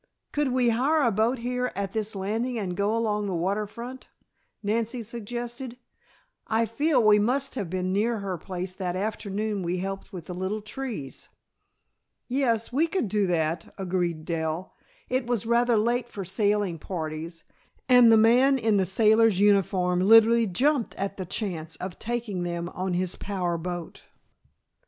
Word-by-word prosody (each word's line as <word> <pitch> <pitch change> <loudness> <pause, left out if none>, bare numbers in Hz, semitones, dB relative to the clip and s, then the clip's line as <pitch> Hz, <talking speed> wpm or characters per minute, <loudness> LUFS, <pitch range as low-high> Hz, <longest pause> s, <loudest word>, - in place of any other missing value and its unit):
"Could 295 -1 +1
we 250 -1 +3
hire 280 +7 +2
a 235 - +3
boat 220 +5 +1
here 250 +1 -2
at 200 -1 -3
this 220 -1 -2
landing 225 +6 -2
and 185 -5 -3
go 205 +3 +1
along 210 -2 0
the 190 - -2
water 195 +5 -1
front?" 245 +5 -9 0.6
Nancy 230 +3 -1
suggested. 240 +3 -6 0.7
"I 225 +1 +2
feel 280 +4 +1
we 210 -1 +6
must 265 +6 +1
have 205 -9 -3
been 185 +1 -1
near 225 +4 +1
her 195 -3 -3
place 185 +2 -5
that 185 -2 -3
afternoon 205 +1 -2
we 175 +1 -1
helped 195 +1 -5
with 175 -4 -8
the 180 - -6
little 190 +4 -3
trees." 215 - -6 1.0
"Yes, 245 -3 0
we 310 +6 +3
could 325 - -1
do 205 -1 +1
that," 165 -1 -1
agreed 175 -4 -2
Dell. 165 +1 -3 0.3
It 255 -1 -1
was 240 -3 -1
rather 235 0 +3
late 240 +2 0
for 195 -4 -6
sailing 200 -2 0
parties, 165 -1 -5 0.4
and 245 -2 +7
the 225 - +7
man 250 +5 +5
in 220 -4 +2
the 190 -2 +2
sailor's 220 +1 +4
uniform 190 -3 +3
literally 225 +3 +6
jumped 260 +6 +1
at 195 0 -4
the 185 -3 -5
chance 165 -6 -3
of 185 -1 -7
taking 230 -5 -3
them 170 0 -3
on 185 0 -3
his 180 0 -1
power 180 -4 -2
boat. 175 0 -6
210 Hz, 160 wpm, -26 LUFS, 185-235 Hz, 1.0 s, and